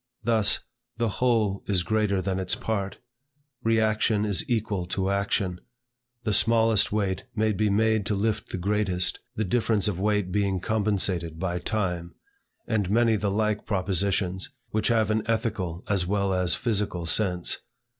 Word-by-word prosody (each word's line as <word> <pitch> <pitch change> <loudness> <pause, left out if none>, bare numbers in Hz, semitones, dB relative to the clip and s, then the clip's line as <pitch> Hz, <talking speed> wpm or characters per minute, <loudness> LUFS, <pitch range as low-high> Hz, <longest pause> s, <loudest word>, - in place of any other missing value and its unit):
Thus, 110 -3 +2 0.4
"the 115 -1 +1
whole 110 -6 +2
is 95 -4 +1
greater 100 0 +1
than 95 0 -1
its 95 -1 0
part;" 100 -3 -3 0.6
"reaction 110 -1 +2
is 100 -5 +1
equal 105 -6 -1
to 95 +1 -1
action;" 100 -2 -1 0.6
"the 110 - 0
smallest 115 0 +4
weight 100 -3 -1
may 110 0 +2
be 105 +1 +1
made 110 0 +2
to 105 - 0
lift 105 +1 -1
the - - -3
greatest, 95 -1 0 0.2
the 110 - -1
difference 110 0 +1
of 95 -4 -2
weight 105 -2 +1
being 100 -1 +1
compensated 95 -6 0
by 90 0 -2
time;" 90 -5 -2 0.5
and 105 -5 0
many 115 +1 +3
the 105 -1 0
like 105 +1 0
propositions, 95 -1 0 0.2
which 110 - 0
have 110 -2 +2
an 110 0 +1
ethical 110 -7 -2
as 95 -3 +1
well 100 0 +1
as 90 -1 +2
physical 100 -7 -1
sense. 90 -1 +1
100 Hz, 150 wpm, -26 LUFS, 95-110 Hz, 0.6 s, smallest